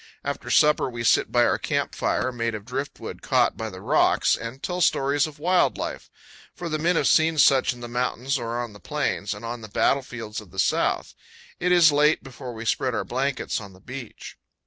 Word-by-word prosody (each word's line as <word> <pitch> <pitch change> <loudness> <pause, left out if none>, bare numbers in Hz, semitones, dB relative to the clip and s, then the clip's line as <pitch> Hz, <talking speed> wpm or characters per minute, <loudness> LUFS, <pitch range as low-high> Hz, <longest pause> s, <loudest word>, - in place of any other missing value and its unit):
After - - -4
supper 150 -3 +4
we 120 -1 -5
sit 115 - +3
by - - +4
our - - +1
camp - - -1
fire, 130 - 0
made 115 -2 -2
of 105 -1 -8
driftwood 135 +4 -6
caught - - +2
by - - -4
the - - -10
rocks, - - +3
and 115 +4 -8
tell 180 0 -2
stories 140 -2 +2
of 155 - -11
wild 180 +4 +2
life; - - -5 0.5
for 175 -2 -5
the 155 0 -2
men 170 +3 +2
have - - +2
seen 160 0 +3
such 135 -2 +5
in 125 -1 -9
the 120 - -6
mountains 125 +3 -1
or 120 0 -3
on 120 -3 -5
the 105 - -13
plains, 140 -9 -2
and 105 +3 -9
on 120 0 -5
the 110 - -8
battlefields 115 -1 -1
of 105 - -16
the 95 - -15
South. - - +1 0.5
It 180 +1 +1
is 170 -3 +7
late 150 +2 +3
before 130 -1 -8
we 110 +1 -7
spread 125 +1 0
our - - -2
blankets 130 -1 -2
on 100 -2 -11
the 95 - -17
beach. 130 +2 -9
130 Hz, 215 wpm, -24 LUFS, 115-150 Hz, 0.5 s, is